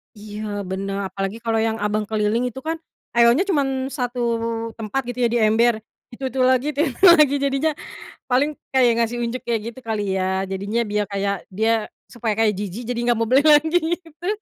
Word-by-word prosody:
Iya, 210 -1 -6
benar, 195 +1 -3
apalagi 195 +3 -3
kalau 225 -1 +1
yang 220 0 +1
abang 210 0 0
keliling 220 +3 0
itu, 250 +2 -6
kan, 325 +1 -2 0.4
airnya 235 +8 +5
cuman 270 -4 0
1 250 -2 -3 0.6
tempat, 225 +5 -2
gitu, 245 +1 -5
ya, - - +2
di - - +3
ember, 225 +2 +4 0.4
itu-itu 260 +1 -4
lagi, 260 +2 +3
itu 290 +1 -1 0.2
lagi, 305 -6 +7
jadinya 280 +3 +1 0.6
paling 265 +4 +2 0.2
kayak 250 -2 +5
ngasih 235 +1 0
unjuk, 240 +2 -3
kayak 230 -2 0
gitu 260 - -13
kali, 215 -2 -1
ya, 190 +1 0
jadinya 200 +5 -1
biar 210 -1 -1
kayak 200 -1 -2
dia 220 +2 0 0.2
supaya 230 -3 -2
kayak 220 -1 +2
jijik, 205 +4 -5
jadi 240 -1 -2
nggak 240 -2 +2
mau 230 - 0
beli 270 +3 +5
lagi 310 +3 +5 0.2
itu. 330 +2 -10
235 Hz, 180 wpm, -22 LUFS, 210-265 Hz, 0.6 s, lagi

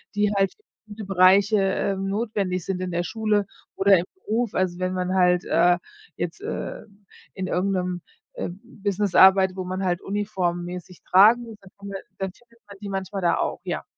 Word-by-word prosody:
die 205 0 +2
halt 195 -1 +2
für 425 - -35 0.2
viele 215 0 -8
Bereiche, 195 +2 +5
ähm, 195 0 -1
notwendig 195 -4 -2
sind. 185 -1 -3
In 185 - -3
der 175 0 -1
Schule 210 +1 0 0.3
oder 195 0 +5
im 175 - -3
Beruf. 235 - -2
Also 185 -1 0
wenn 185 0 -1
man 185 0 -2
halt, 180 -1 +3
äh, 175 0 +3 0.4
jetzt, - - -5
äh, - - -5 0.5
in 185 -1 -3
irgend 190 +2 0
'nem, 180 -1 -2 0.3
ähm, 175 +2 -5
Business 205 -4 -2
arbeitet, 190 -1 +6
wo 185 - -4
man 185 +1 -3
halt 175 -1 0
uniformmäßig 180 -3 -3
tragen 215 +6 +6
muss, 225 -3 -10
dann 195 -2 -17
findet 200 -1 -7
dann 190 -1 -3
findet 235 +1 -26
man 200 - -12
die 205 - -6
manchmal 195 0 -4
da 170 -1 +2
auch, - - -2
ja. - - -3
190 Hz, 185 wpm, -24 LUFS, 180-205 Hz, 0.5 s, arbeitet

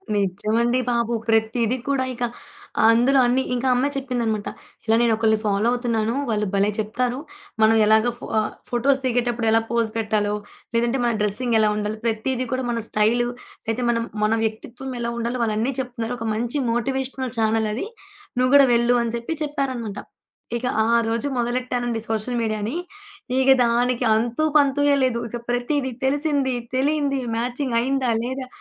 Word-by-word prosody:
నిజమండి 215 +6 +1
బాబు, 235 0 0 0.2
ప్రతిది 225 +2 +2
కూడా 275 -2 +1
ఇక 245 0 -5 0.7
అందులో 250 +4 +4
అన్ని 260 +2 +2
ఇంకా 250 +1 -1
ఆ - - +4
అమ్మాయి 280 +3 0
చెప్పిందన్నమాట 240 -6 -2 0.4
ఇలా 225 0 +3
"నేనొకల్లని 220 -2 +2
ఫాలో 205 +2 +1
అవుతున్నాను 230 -2 0 0.2
వాళ్ళు 210 -1 0
భలే 200 +1 +3
చెప్తారు. 245 +4 -1 0.4
మనం 220 +1 +5
ఎలాగా 220 +2 +4
ఫా 215 - 0 0.3
ఫోటోస్ 265 +3 +2
దిగేటప్పుడు 240 -2 0
ఎలా 225 0 +4
పోజ్ 230 -2 +1
పెట్టాలో, 210 -1 0 0.4
లేదంటే 235 +3 +1
మన 235 - +2
డ్రెస్సిగ్ 225 +3 0
ఎలా 215 -1 +4
ఉండాలో 210 +1 -2
ప్రతీది 245 +3 -1
కూడా 255 0 -1
మన 230 -1 -1
స్టైలు, 230 +3 +2 0.4
లేతే 245 +2 -1
మనం 230 -1 +1 0.2
మన 215 +1 +3
వ్యక్తిత్వం 235 +4 -4
ఎలా 235 0 -2
ఉండాలో 235 +2 -2
వాళ్ళు 215 -2 0
అన్ని 250 +5 0
చెప్తున్నారు. 245 -2 -3
ఒక 230 - -3
మంచి 240 +6 -2
మోటివేషనల్ 260 +1 -2
చానెల్ 220 0 +2
అది, 275 - -3 0.5
నువ్వు 255 +1 +2
గూడా 275 -2 +8
వెళ్ళు" 240 +1 +3
అని 230 0 -3
చెప్పి 235 +8 -4
చెప్పారన్నమాట. 260 -8 -3 0.6
ఇక 250 - -5 0.2
ఆ - - 0 0.2
రోజు 230 +5 -1
మొదలెట్టానండి 240 -1 -1
సోషల్ 225 +2 -1
మీడియా‌ని, 215 +4 -2 0.6
ఇగ 265 0 +3 0.2
దానికి 245 +1 +1
అంతుపంతూయే 285 +4 +2
లేదు. 240 -2 +1
ఇక 240 - -4
ప్రతీది, 260 +2 0
తెలిసింది, 285 -2 +1 0.2
తెలియంది, 280 0 +1 0.2
మ్యాచింగ్ 245 +1 -2
అయిందా, 260 -1 0
లేదా 260 +1 -4
240 Hz, 150 wpm, -23 LUFS, 225-260 Hz, 0.7 s, గూడా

